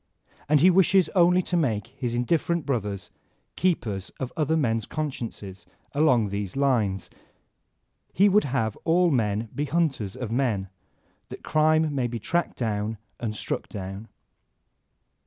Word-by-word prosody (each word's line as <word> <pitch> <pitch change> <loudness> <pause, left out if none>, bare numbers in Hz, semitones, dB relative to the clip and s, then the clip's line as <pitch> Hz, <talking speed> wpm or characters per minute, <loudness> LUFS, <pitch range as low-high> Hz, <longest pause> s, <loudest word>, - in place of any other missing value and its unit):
And 150 -2 +5
he 185 +3 +7
wishes 190 0 +4
only 180 0 +4
to 180 - -2
make 115 - +1
his 120 -2 -2
indifferent 165 +6 0
brothers 105 -8 -3 0.4
keepers 110 - -1
of 130 -2 -4
other 160 0 +1
men's 115 -7 0
consciences 115 - -5 0.3
along 130 -8 +3
these 100 -1 -4
lines. 110 -10 0 1.0
He 200 +3 +4
would 205 +1 +4
have 120 -6 -1
all 175 +1 +2
men 110 -3 0
be 145 - -2
hunters 145 - -1
of 120 -4 -5
men, 115 -7 0 0.6
that - - -9
crime 155 0 +2
may 130 -3 0
be 120 0 -4
tracked 170 +10 -1
down 110 -2 -2 0.2
and 110 -3 -3
struck - - -3
down. 95 +2 -7
125 Hz, 140 wpm, -26 LUFS, 105-155 Hz, 1.0 s, he